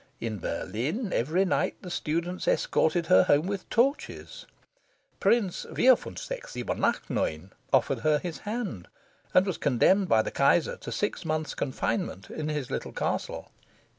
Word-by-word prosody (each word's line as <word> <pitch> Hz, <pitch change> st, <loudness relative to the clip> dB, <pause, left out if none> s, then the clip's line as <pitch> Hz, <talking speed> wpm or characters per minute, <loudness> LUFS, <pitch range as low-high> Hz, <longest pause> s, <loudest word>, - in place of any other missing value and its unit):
In 110 Hz, -3 st, -4 dB
Berlin, 155 Hz, -, -3 dB
every 165 Hz, +10 st, +2 dB
night, 185 Hz, -, 0 dB
the 180 Hz, -, -7 dB
students 170 Hz, +3 st, -2 dB
escorted 170 Hz, +1 st, +2 dB
her 95 Hz, -12 st, +6 dB
home 145 Hz, +3 st, +3 dB
with 195 Hz, -1 st, -4 dB
torches. 275 Hz, -, -1 dB, 0.7 s
Prince 210 Hz, -7 st, +2 dB
Vierfuenfsechs -, -, +1 dB
Siebenachtneun -, -, -1 dB, 0.2 s
offered -, -, +3 dB
her 155 Hz, -1 st, +3 dB
his 170 Hz, +1 st, -5 dB
hand, 210 Hz, -, -4 dB, 0.4 s
and 185 Hz, -, +5 dB
was 190 Hz, -4 st, -3 dB
condemned 180 Hz, -, +3 dB
by 110 Hz, -4 st, +4 dB
the -, -, -4 dB
Kaiser 140 Hz, +4 st, +3 dB
to -, -, -8 dB
six 205 Hz, -3 st, -2 dB
months' 155 Hz, -1 st, -2 dB
confinement 130 Hz, -, -3 dB
in 155 Hz, -1 st, -3 dB
his 150 Hz, -4 st, -3 dB
little -, -, -3 dB
castle. -, -, -3 dB
170 Hz, 135 wpm, -28 LUFS, 145-200 Hz, 0.7 s, her